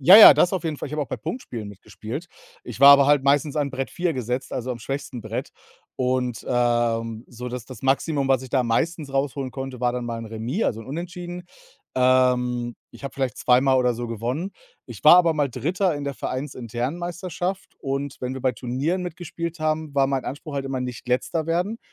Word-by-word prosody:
Ja, 180 +9 +9
ja, 215 - +12
das 165 +6 +3
auf 190 - -1
jeden 155 -2 -2
Fall. - - -5
Ich 145 - -9
habe 150 0 -1
auch 140 - -7
bei - - -3
Punktspielen 120 - -6
mitgespielt. 110 - -8 0.3
Ich 120 -2 -8
war 140 0 +11
aber 140 -1 +6
halt 145 -2 +4
meistens 145 +1 +2
an 145 -2 0
Brett 135 0 -4
4 175 -1 -1
gesetzt, 125 0 -3
also 130 0 -3
am 120 - -4
schwächsten 135 0 -5
Brett. 110 +1 -5 0.5
Und, 125 -2 -1
ähm, 120 -1 +1
so, 125 +1 -7
dass 125 -1 -6
das 130 +2 -11
Maximum, 135 +1 +1
was 130 -1 +3
ich 130 - -10
da 130 -1 +2
meistens 145 +5 -1
rausholen 135 -1 -1
konnte, 130 -1 -6
war 125 -1 +2
dann 125 -1 -3
mal 115 -1 -4
'n 115 - -7
Remis, 115 - -2
also 110 - -1
'n 115 - -11
Unentschieden. 175 +4 -6 0.5
Ähm, 125 -2 +2 0.2
ich - - -14
habe 140 - -5
vielleicht 130 -5 -2
zweimal 130 +1 +4
oder 125 -1 +3
so 120 +1 -4
gewonnen. 120 - -3 0.3
Ich - - -10
war - - +9
aber 170 -2 +4
mal 145 -2 +1
3. 180 - 0
in 145 - -5
der 140 0 -3
Vereinsinternen 130 0 -4
Meisterschaft 175 +2 -4
und 140 +1 -3
wenn 125 0 -3
wir 130 - -6
bei 130 0 +1
Turnieren 140 +11 -2
mitgespielt 170 -1 -5
haben, 155 -1 -1
war 135 -1 +5
mein 135 -1 -1
Anspruch 145 +2 -6
halt 140 -1 -2
immer: 135 -1 -3
„Nicht 125 0 -6
Letzter 155 +6 0
werden“. 180 +7 -1
135 Hz, 210 wpm, -24 LUFS, 125-155 Hz, 0.5 s, ja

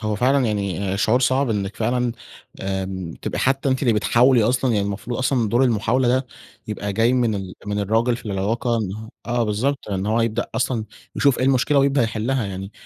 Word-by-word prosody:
هو 110 -1 -1
فعلًا 130 +4 +3
يعني 100 -2 -2
شعور 110 +5 +2
صعب 130 +1 +2
إنّك 100 -2 -2
فعلًا 120 +1 0 0.5
آمم 95 -3 -3
تبقى - - -3
حتّى 135 +1 +1
أنتِ 130 +1 0
اللي 120 -4 +3
بتحاولي 120 +3 +4
أصلًا، 125 +3 +1
يعني 100 -2 +1
المفروض 100 +4 -4
أصلًا 130 -3 +1
دور 120 +5 +3
المحاولة 120 +2 +1
ده 130 +1 +1 0.4
يبقى 105 -1 -3
جاي 115 +5 +2
من 120 -4 +2
ال 95 -2 -5
من 105 0 -2
الراجل 115 +4 +1
في 115 - -12
العلاقة 110 +5 -1
إن 110 +1 -5 0.2
آه 120 0 0
بالضبط، 120 +7 -1
إن 95 0 -2
هو 110 +2 +1
يبدأ 115 0 0
أصلًا 120 -3 0 0.3
يشوف 140 -3 +3
إيه - - +1
المشكلة 135 +2 +3
ويبدأ 140 -1 +3
يحلها. 115 +3 -1
يعني 95 +1 -6
115 Hz, 190 wpm, -22 LUFS, 105-125 Hz, 0.5 s, بتحاولي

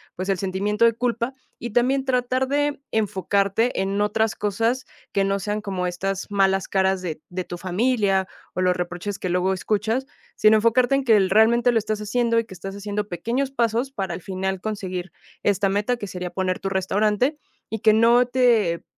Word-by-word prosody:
pues 185 +2 -4
el 195 - +2
sentimiento 200 +4 0
de 230 - +4
culpa 235 +2 -1 0.3
y 240 - -5
también 260 +4 +2
tratar 255 0 0
de 290 +1 0
enfocarte 200 +2 0
en 195 +1 -1
otras 215 +1 +1
cosas 230 +5 -1 0.3
que 195 -1 +1
no 195 0 0
sean 210 +3 -2
como 190 -3 -3
estas 195 +3 -3
malas 195 -1 +2
caras 190 -1 +1
de 165 -4 -4
de 185 +1 -4
tu 175 - -7
familia 195 0 +1 0.3
o 185 - -2
los 180 0 +2
reproches 180 +3 -4
que - - -3
luego 180 +1 +1
escuchas, 220 +6 -1 0.3
sino 215 0 +6
enfocarte 235 +4 +3
en 275 - 0
que 225 -4 +5
el 190 -2 +2
realmente 235 +4 +4
lo 225 - +4
estás 215 0 -3
haciendo 230 +2 +1
y 230 - -2
que 205 - -12
estás 195 +1 -7
haciendo 205 0 -3
pequeños 235 +10 -2
pasos 240 +1 0
para 190 -8 -3
al 175 - -6
final 190 0 -3
conseguir 185 -5 -4 0.3
esta 200 0 +2
meta, 205 +5 0
que 205 - -6
sería 180 -1 -5
poner 185 0 -2
tu 195 - -2
restaurante 210 +8 +1 0.3
y 220 - -3
que 215 - +5
no 235 +3 +5
te 235 -9 +2
205 Hz, 190 wpm, -23 LUFS, 190-235 Hz, 0.3 s, sino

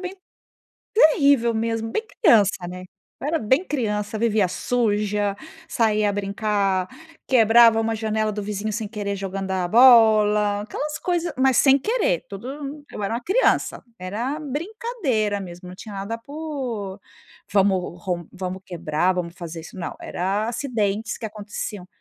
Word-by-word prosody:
bem 365 +1 -5 0.8
terrível 280 - +5
mesmo, 225 0 -1
bem 440 - -1 0.2
criança, 205 - +4
né. 180 +1 -7 0.4
Eu 285 - -3
era 325 +1 +1
bem 260 - +2
criança, 215 -5 -2
vivia 220 -3 +2
suja, 210 -3 0 0.3
saía 215 -3 +2
a - - +1
brincar, 200 -1 0 0.4
quebrava 230 -2 +6
uma 225 0 0
janela 220 0 -1
do 210 -1 -4
vizinho 210 +1 -3
sem 215 -2 -3
querer 205 -2 -3
jogando 195 0 -4
a 185 -1 0
bola, 215 -3 +6
aquelas 295 +7 -4
coisas 350 -1 -1
mas, 260 -1 +3
sem 275 0 +5
querer, - - 0
tudo 275 +8 -7
eu - - -6
era 200 - -1
uma 235 - -2
criança, 435 +7 +1 0.2
era 225 +11 -3
brincadeira 295 - -2
mesmo, 180 -1 -9
não 180 - -10
tinha 205 +1 -9
nada 200 +4 -4
por 255 -8 -5 0.5
"vamos 190 -3 +1
rom 175 -2 -2
vamos 185 0 -5
quebrar, 175 0 0
vamos 175 -2 -3
fazer 170 -2 -7
isso". 165 - -12
Não! 170 - -5
Era 195 +4 -1
a - - -2
acidentes 225 -4 -2
que - - -6
aconteciam. 205 -2 -6
215 Hz, 150 wpm, -23 LUFS, 195-255 Hz, 0.8 s, quebrava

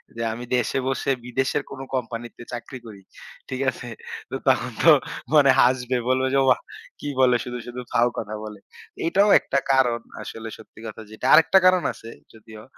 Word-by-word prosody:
যে, 115 - -5
আমি 120 +2 -7
দেশে 125 +2 0
বসে 135 +1 0
বিদেশের 135 +3 -1
কোন 135 - -8 0.2
কোম্পানিতে 120 -1 -5
চাকরি 120 +2 -7
করি। 105 -3 -11 0.5
ঠিক 130 0 -4
আছে? 120 0 -8 0.4
তো - - -3
তখন - - +2
তো - - +8 0.4
মানে 145 -3 +6
হাসবে 125 0 +2
বলবে 130 0 +2
যে, 140 - +4
"ওয়া! 130 - +5 0.4
কি - - -6
বলে 125 -1 +5
শুধু, 125 0 -6
শুধু 125 +1 -7
ফাউ 120 +1 +3
কথা 110 -1 -4
বলে।" 105 -1 -9 0.5
এটাও 195 +5 +3
একটা 140 - -2
কারণ 125 -3 +3 0.2
আসলে 115 0 -8
সত্যি - - -16
কথা 110 - -8
যেটা 110 - -8
আরেকটা 165 +4 +6
কারণ 185 -1 +5
আছে, 115 - -12 0.2
যদিও 110 -1 -13
125 Hz, 175 wpm, -23 LUFS, 115-135 Hz, 0.5 s, তো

